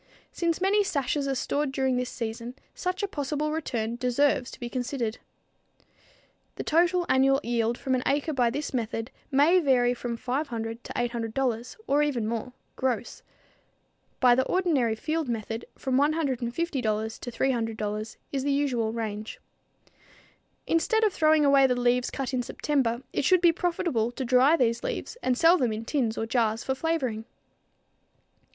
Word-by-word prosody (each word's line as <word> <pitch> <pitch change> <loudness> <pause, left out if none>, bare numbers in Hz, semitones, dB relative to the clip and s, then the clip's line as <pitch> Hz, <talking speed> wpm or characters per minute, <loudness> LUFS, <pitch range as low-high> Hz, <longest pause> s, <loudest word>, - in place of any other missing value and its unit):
Since 335 -2 -1
many 405 +2 +3
sashes 285 -5 -1
are 270 - 0
stored 285 +2 -1
during 265 -1 0
this 250 0 -1
season, 235 +1 -5 0.2
such 365 +2 -3
a - - +1
possible 300 -3 -2
return 235 -7 -2
deserves 250 +1 +1
to - - -11
be 240 - -4
considered. 245 -2 -3 1.4
The - - -4
total 350 +2 +2
annual 270 +1 +4
yield 235 0 0
from 265 -2 -2
an 255 - +1
acre 290 +3 +1
by 245 -3 +2
this 285 +5 -4
method 225 0 -3 0.2
may 300 +6 +5
vary 250 -6 +3
from 240 -1 -4
$500 240 -3 -3
to - - -8
$800 240 0 -2
or 285 +1 +2
even 260 -7 0
more 230 +2 -3 0.2
gross. 245 -3 -2 1.0
By 250 -2 +6
the 255 - +3
ordinary 295 -12 +1
field 310 +3 -2
method 225 0 -3
from 260 0 0
$150 290 -3 +1 0.8
to 245 - -6
$300 225 -4 -2 0.2
is 270 -2 -2
the 285 - +1
usual 260 -6 0
range. 220 -2 -5 1.3
Instead 445 +7 +2
of 425 -3 +3
throwing 310 -3 +4
away 275 -1 +6
the 250 -1 0
leaves 245 0 +2
cut 270 -1 -4
in 255 - +1
September, 245 -1 -1
it - - 0
should 365 +6 +5
be 345 -1 +5
profitable 335 -9 0
to 260 - -4
dry 260 +5 +5
these 235 -3 +1
leaves - - -4
and 255 -1 +1
sell 335 +4 +5
them 245 -4 +1
in 220 +1 -4
tins 235 -5 -1
or 225 - -1
jars 225 -1 0
for 265 - 0
flavoring. 265 -7 -2
255 Hz, 160 wpm, -27 LUFS, 235-295 Hz, 1.4 s, By